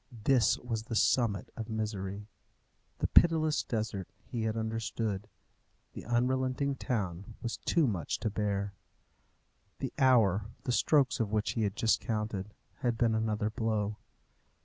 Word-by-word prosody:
This 130 Hz, -2 st, +4 dB
was 115 Hz, -3 st, -3 dB
the 115 Hz, -, -4 dB
summit 110 Hz, -4 st, +2 dB
of 110 Hz, -1 st, -6 dB
misery. 105 Hz, -2 st, -3 dB, 0.7 s
The -, -, 0 dB
pitiless 160 Hz, -2 st, +5 dB
desert 105 Hz, -4 st, -3 dB, 0.2 s
he 120 Hz, -, -4 dB
had 110 Hz, 0 st, -1 dB
understood; 110 Hz, -2 st, -2 dB, 0.6 s
the -, -, -8 dB
unrelenting 130 Hz, +3 st, +1 dB
town 100 Hz, -4 st, -3 dB
was 115 Hz, -, -2 dB
too 165 Hz, -3 st, +2 dB
much 95 Hz, -, -1 dB
to 110 Hz, -, -1 dB
bear. 100 Hz, -1 st, -1 dB, 1.0 s
The -, -, -4 dB
hour, 110 Hz, -6 st, +4 dB
the 125 Hz, -, -1 dB
strokes 140 Hz, +1 st, +3 dB
of 110 Hz, -3 st, 0 dB
which 105 Hz, 0 st, +1 dB
he 115 Hz, -, -2 dB
had 100 Hz, -2 st, 0 dB
just 115 Hz, 0 st, +3 dB
counted, 105 Hz, -2 st, -3 dB, 0.2 s
had 120 Hz, -2 st, 0 dB
been 115 Hz, -1 st, +3 dB
another 110 Hz, -1 st, 0 dB
blow. 110 Hz, -2 st, -1 dB
110 Hz, 140 wpm, -31 LUFS, 105-120 Hz, 1.0 s, pitiless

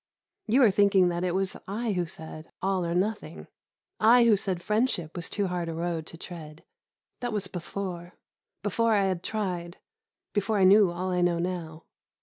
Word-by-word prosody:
You 250 Hz, +5 st, +4 dB
are 220 Hz, -, +6 dB
thinking 195 Hz, -2 st, +4 dB
that 175 Hz, 0 st, -2 dB
it 180 Hz, -1 st, 0 dB
was 190 Hz, 0 st, 0 dB
I 220 Hz, +4 st, -2 dB
who 180 Hz, -3 st, -1 dB
said, 160 Hz, 0 st, -9 dB
"All 190 Hz, -1 st, 0 dB
or 170 Hz, 0 st, -2 dB
nothing," 180 Hz, -, -2 dB, 0.5 s
I 235 Hz, +3 st, +6 dB
who 230 Hz, -2 st, +5 dB
said 190 Hz, -3 st, -1 dB
friendship 210 Hz, -4 st, -1 dB
was 175 Hz, -2 st, -1 dB
too 205 Hz, -, -1 dB
hard 180 Hz, -2 st, -2 dB
a 165 Hz, -, -4 dB
road 165 Hz, -1 st, -3 dB
to 165 Hz, -, -9 dB
tread. 160 Hz, -3 st, -10 dB, 0.6 s
That 245 Hz, -1 st, -3 dB
was 210 Hz, -3 st, 0 dB
before 180 Hz, -1 st, -6 dB, 0.5 s
before 225 Hz, +3 st, +1 dB
I 200 Hz, -2 st, +3 dB
had 185 Hz, -3 st, -1 dB
tried; 180 Hz, -5 st, -3 dB, 0.6 s
before 210 Hz, +1 st, 0 dB
I 195 Hz, -, +3 dB
knew 195 Hz, +1 st, +7 dB
all 180 Hz, +2 st, -3 dB
I 180 Hz, 0 st, +1 dB
know 175 Hz, -1 st, +2 dB
now. 170 Hz, -2 st, -4 dB
185 Hz, 180 wpm, -27 LUFS, 170-205 Hz, 0.6 s, knew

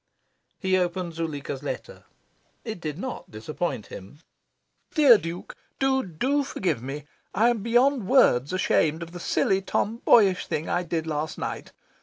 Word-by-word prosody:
He 190 Hz, -1 st, +1 dB
opened 175 Hz, -1 st, -2 dB
Zuleika's 150 Hz, -4 st, -4 dB
letter. 315 Hz, -, -6 dB, 0.6 s
It 220 Hz, -6 st, -5 dB
did 155 Hz, -2 st, -4 dB
not 255 Hz, +6 st, -6 dB
disappoint 115 Hz, +3 st, -4 dB
him. 100 Hz, +9 st, -10 dB, 0.8 s
"DEAR 275 Hz, -9 st, +7 dB
DUKE, 165 Hz, +2 st, -7 dB, 0.2 s
DO, 270 Hz, 0 st, +2 dB
DO 260 Hz, -, 0 dB
forgive 190 Hz, -, -2 dB
me. 135 Hz, +3 st, -6 dB, 0.3 s
I 225 Hz, +5 st, +4 dB
am 235 Hz, -3 st, 0 dB
beyond 240 Hz, 0 st, +2 dB
words 145 Hz, -, +4 dB
ashamed 165 Hz, -3 st, +1 dB
of 165 Hz, -, -10 dB
the 175 Hz, -, -8 dB
silly 190 Hz, +2 st, +1 dB
tomboyish 205 Hz, -1 st, +3 dB
thing 155 Hz, -, -2 dB
I 175 Hz, -, 0 dB
did 165 Hz, -2 st, -3 dB
last 155 Hz, 0 st, -3 dB
night. -, -, -5 dB
180 Hz, 145 wpm, -25 LUFS, 155-230 Hz, 0.8 s, DEAR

